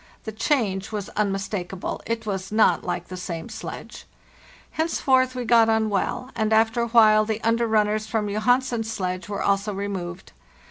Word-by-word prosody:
The 220 - -5
change 210 -5 0
was 205 -2 -4
unmistakable; 195 -2 -3
it 225 0 -2
was 190 -2 -4
not 215 +1 +3
like - - -3
the 185 - -6
same 170 -3 -6
sledge. - - -8 0.7
Henceforth 260 -5 +1
we 250 -1 -3
got 230 -1 +5
on 220 -1 +2
well, 245 +6 -2
and 220 -1 0
after 225 +1 +3
a 235 - 0
while 215 -2 +6
the 215 0 -2
under 230 +1 +2
runners 215 0 +1
from 215 -1 -1
Johansen's 230 +2 +1
sledge 185 -4 -3
were 200 - -3
also 200 +1 0
re 200 +1 -3
moved. 180 -2 -6
215 Hz, 170 wpm, -24 LUFS, 195-230 Hz, 0.7 s, while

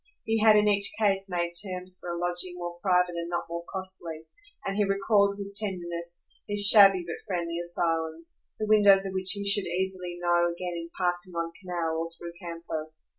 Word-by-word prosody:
He 225 0 0
had 215 0 +6
in 210 0 +4
each 200 -1 +2
case 195 -2 +1
made 175 -1 -2
terms 185 -1 -7
for 175 - -8
a 170 - -3
lodging 175 +1 -2
more 175 0 -7
private 180 -2 +2
and 170 0 -4
not 175 0 -3
more 170 0 -5
costly, 180 -4 -6 0.4
and 195 - -2
he 210 - +2
recalled 200 0 +2
with 200 0 -7
tenderness 175 -4 -3 0.2
these 205 0 +7
shabby 195 -4 +8
but 170 - -7
friendly 170 -3 -3
asylums, 165 -1 -2 0.2
the 215 - -2
windows 205 -2 +5
of 190 - -4
which 190 +1 -1
he 200 -1 -4
should 200 -1 +4
easily 180 0 -3
know 175 0 +2
again 175 +1 -5
in 170 0 -6
passing 175 0 -1
on 170 0 -3
canal 170 -3 -3
or 165 0 -3
through 170 0 -9
campo. 165 -2 -6
180 Hz, 190 wpm, -27 LUFS, 170-195 Hz, 0.4 s, shabby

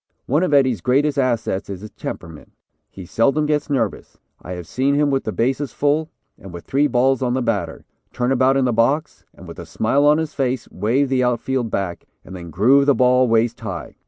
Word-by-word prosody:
One 145 +6 +1
of 185 - 0
Eddie's 130 -8 +3
greatest 140 - +1
assets 120 -7 -1
is 95 -2 -6
his 105 - -10
temperament. 80 -3 -9 0.4
He 95 - -11
seldom 135 - +1
gets 150 0 -1
nervous. 120 -7 -2 0.2
I 90 - -7
have 90 -1 -7
seen 135 - 0
him 145 0 +2
with 135 -1 -1
the - - -2
bases 135 +4 -1
full, 150 +2 0 0.3
and 95 - -11
with 85 -1 -10
three 145 +2 +1
balls 130 0 +1
on 125 -1 0
the 130 - 0
batter, 100 -8 -3 0.3
turn 125 +1 -1
about 135 +1 +3
in 135 - +2
the 125 - +1
box 140 +7 0
with - - -11
a - - -8
smile 135 +6 +1
on 150 +1 +5
his 160 -1 -3
face, 130 -3 -2
wave 125 +8 0
the 130 -1 +1
outfield 125 0 -1
back, 95 -4 -4 0.2
and 95 - -10
then 85 -2 -9
groove 130 - +3
the 140 - +4
ball 125 0 +3
waist 115 0 +1
high. 90 -9 -6
125 Hz, 210 wpm, -20 LUFS, 110-140 Hz, 0.4 s, on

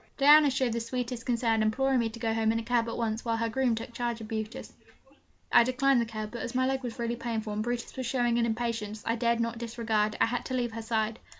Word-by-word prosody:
Diana 295 +1 +7
showed 260 -3 0
the 235 - -1
sweetest 240 0 -4
concern, 230 -2 +1
imploring 260 +4 +2
me 230 -1 +1
to 225 - -10
go 225 -1 0
home 220 0 +2
in 225 - 0
a 230 - -2
cab 235 0 +1
at - - -4
once, 225 -1 -2
while 230 -1 0
her 230 0 -1
groom 245 0 +1
took 225 +1 -7
charge 240 -1 -2
of 220 -1 -9
Brutus. 220 +2 -5 0.8
I - - +7
declined 255 +1 +2
the - - 0
cab; 215 -1 -6
but, 235 - -6
as 250 0 -5
my 255 0 +2
leg 265 0 0
was 245 -1 -6
really 235 0 -2
painful, 225 -2 -3
and 210 - -2
Brutus 240 +1 -3
was 260 -2 -3
showing 240 -1 +1
an 235 - +2
impatience 220 -2 -3
I 230 - +1
dared 235 0 +1
not 230 0 -2
disregard, 220 -2 -1
I - - +5
had 245 +1 -2
to 260 - -3
leave 240 -2 -1
her 225 0 -5
side. 220 0 -1
235 Hz, 260 wpm, -29 LUFS, 225-245 Hz, 0.8 s, Diana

